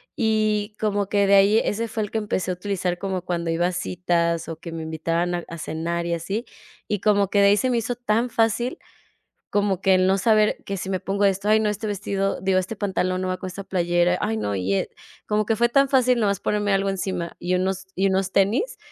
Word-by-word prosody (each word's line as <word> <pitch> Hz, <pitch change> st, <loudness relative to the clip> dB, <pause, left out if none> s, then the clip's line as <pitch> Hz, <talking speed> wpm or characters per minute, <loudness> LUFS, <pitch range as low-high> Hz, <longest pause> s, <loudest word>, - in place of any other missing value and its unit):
y 215 Hz, -1 st, 0 dB
como 205 Hz, -2 st, 0 dB
que 200 Hz, -1 st, +2 dB
de 200 Hz, -, +3 dB
ahí 200 Hz, +2 st, +6 dB
ese 230 Hz, +2 st, -1 dB
fue 220 Hz, -1 st, -3 dB
el 205 Hz, -, -6 dB
que 220 Hz, -, 0 dB
empecé 190 Hz, -3 st, -2 dB
a -, -, 0 dB
utilizar 180 Hz, -1 st, -2 dB
como 190 Hz, -2 st, -3 dB
cuando 170 Hz, -2 st, -2 dB
iba 165 Hz, +1 st, +1 dB
a -, -, -3 dB
citas 175 Hz, -1 st, -1 dB
o 165 Hz, -, -5 dB
que 170 Hz, +1 st, -9 dB
me 165 Hz, -1 st, -5 dB
invitaban 165 Hz, +2 st, -1 dB
a 175 Hz, -1 st, -3 dB
a 170 Hz, -, -8 dB
cenar 170 Hz, +2 st, -3 dB
y 170 Hz, -, -1 dB
así, 195 Hz, +8 st, -3 dB, 0.4 s
y 210 Hz, -2 st, -1 dB
como 205 Hz, -2 st, +2 dB
que 205 Hz, -, +3 dB
de 200 Hz, -, +6 dB
ahí 200 Hz, +1 st, +5 dB
se 255 Hz, +4 st, +1 dB
me 240 Hz, -, +1 dB
hizo 240 Hz, +2 st, -3 dB
tan 235 Hz, 0 st, 0 dB
fácil 230 Hz, +2 st, 0 dB, 0.8 s
como 200 Hz, -2 st, +1 dB
que 190 Hz, -1 st, +4 dB
el 185 Hz, 0 st, +3 dB
no 190 Hz, +1 st, +3 dB
saber: 215 Hz, +1 st, +2 dB
"Que 195 Hz, -, -3 dB
si 190 Hz, -, -5 dB
me 185 Hz, -1 st, -2 dB
pongo 200 Hz, +1 st, 0 dB
esto. 195 Hz, +1 st, +1 dB
Ay 215 Hz, -, +5 dB
no, 220 Hz, -, +1 dB
este 210 Hz, +1 st, -4 dB
vestido, 195 Hz, -1 st, -2 dB
digo, 190 Hz, 0 st, +1 dB
este 185 Hz, +4 st, -2 dB
pantalón 185 Hz, -2 st, -1 dB
no 185 Hz, -, -2 dB
va 185 Hz, -, -1 dB
con 185 Hz, -, -6 dB
esta 185 Hz, +2 st, -7 dB
playera. 175 Hz, -1 st, +1 dB
Ay 110 Hz, -, -1 dB
no 105 Hz, -1 st, -2 dB
y 95 Hz, +1 st, 0 dB
es", -, -, 0 dB, 0.4 s
como 210 Hz, 0 st, +1 dB
que 225 Hz, +1 st, 0 dB
fue 235 Hz, -, +4 dB
tan 275 Hz, +3 st, +3 dB
fácil 255 Hz, -2 st, +3 dB
nomás 200 Hz, -3 st, +1 dB
ponerme 205 Hz, -1 st, 0 dB
algo 195 Hz, 0 st, +1 dB
encima 185 Hz, -3 st, -3 dB
y 180 Hz, +1 st, -1 dB
unos 190 Hz, +1 st, -1 dB
y 195 Hz, +2 st, +2 dB
unos 190 Hz, 0 st, 0 dB
tenis. 215 Hz, -, +1 dB
195 Hz, 240 wpm, -23 LUFS, 180-210 Hz, 0.8 s, ahí